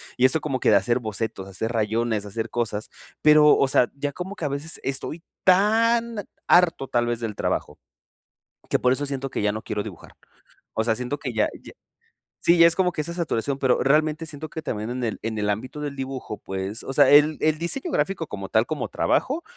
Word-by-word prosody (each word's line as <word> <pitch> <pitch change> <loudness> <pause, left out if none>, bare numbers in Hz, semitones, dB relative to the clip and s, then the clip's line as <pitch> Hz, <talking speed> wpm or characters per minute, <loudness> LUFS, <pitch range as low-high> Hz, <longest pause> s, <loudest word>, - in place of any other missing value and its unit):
y 125 - +3
eso 130 +5 +3
como 140 -3 -2
que - - +3
de 105 - +7
hacer 120 +6 +1
bocetos, 110 -3 -4
hacer 100 +4 -3
rayones, 110 -1 0
hacer 110 +2 -4
cosas. 110 -3 -3 0.3
Pero, 150 -1 +7
o 135 - +3
sea, 125 - +3
ya 145 0 -3
como 185 +5 -6
que 165 - -4
a - - +2
veces, 140 +4 -4
estoy 140 +4 -3 0.2
tan 225 +3 +3 0.2
harto, 170 -6 +4
tal 120 0 +1
vez 120 -1 -1
del 115 -3 -4
trabajo, - - -2 0.9
que - - +2
por 125 - +3
eso 145 +3 0
siento 135 -1 -4
que - - -3
ya 105 - +2
no 110 +1 -5
quiero 105 -1 -3
dibujar. - - -11 0.6
O 110 - 0
sea, 110 0 +1
siento 125 +5 -3
que 130 -4 -5
ya 110 -1 +2
ya - - -13 0.7
Sí, 170 - +5
ya 170 0 +8
es 165 - +2
como 185 -2 +2
que 165 - -8
esa 160 +3 -2
saturación, 145 -6 -2
pero 130 -2 +2
realmente 155 +3 +2
siento 155 -1 -7
que 160 - -6
también 110 -7 -4
en 125 +1 -4
el 110 - -2
en 110 -1 -3
el 105 0 0
ámbito 130 +8 -3
del 145 -1 -4
dibujo, 130 -5 -5
pues, 95 +3 -5
o - - -5
sea 140 0 +5
El 150 +1 +6
el 155 0 +2
diseño 175 - -3
gráfico 195 - -1
como 100 -5 -6
tal, 110 +1 +3
como 155 +1 -3
trabajo, 300 +6 0
135 Hz, 220 wpm, -24 LUFS, 110-155 Hz, 0.9 s, ya